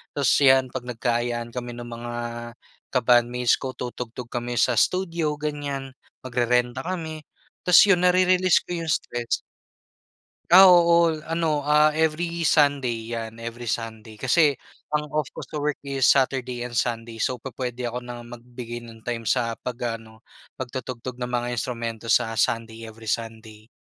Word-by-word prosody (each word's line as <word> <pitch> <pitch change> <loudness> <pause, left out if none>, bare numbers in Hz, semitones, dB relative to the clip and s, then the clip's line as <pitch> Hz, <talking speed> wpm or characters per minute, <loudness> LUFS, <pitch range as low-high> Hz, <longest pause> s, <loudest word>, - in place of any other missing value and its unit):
tapos 140 -3 +2
'yan, 130 -1 +6
'pag 130 - -5
nagka-ayaan 120 0 -2
kami 120 -1 -4
nung 120 0 -8
mga 120 0 -6 0.8
ka-bandmates 120 0 +3
ko, 130 - -4
tutugtog 125 -1 -6
kami 120 0 -3
sa 120 +1 +3
studio, 170 - 0
ganyan, 145 -2 -4 0.3
magrerenta 125 0 +1
kami. 160 -4 -5 0.4
Tapos 180 - +9
yun, 180 -2 +4
narerelease 185 0 +4
ko - - -10
yung 160 - -1
stress. 120 -5 -1 1.1
Ah, 190 +2 +10
oo. 170 -2 +5
Ano, 160 -3 -1
ah, 150 +1 +4
every 165 +2 0
Sunday 130 -7 +2
'yan, 115 0 -6
every 115 +1 -7
Sunday. 110 -2 -5
Kasi 145 +5 +4 0.4
ang 150 0 0
off 150 -4 -1
ko - - -9
sa - - -8
work 150 -1 -1
is 135 -1 -2
Saturday 125 -2 +2
and 120 - -9
Sunday. 115 -1 -1
So, 125 -1 -1
pu 135 +2 -9
puwede 125 -1 -3
ako 120 +1 -5
na 120 0 -7
magbigay 120 0 -8
ng 115 -1 -14
time 120 -1 -2
sa 115 0 0
'pag 120 -1 -4
ano, 110 -1 -14 0.4
pagtutugtog 130 -1 -5
ng 125 0 -5
mga 120 0 -1
instrumento 115 -1 -3
sa 115 -2 +2
Sunday, 115 0 -1
every 110 0 -11
Sunday. 110 -1 -5
125 Hz, 150 wpm, -24 LUFS, 115-150 Hz, 1.1 s, Ah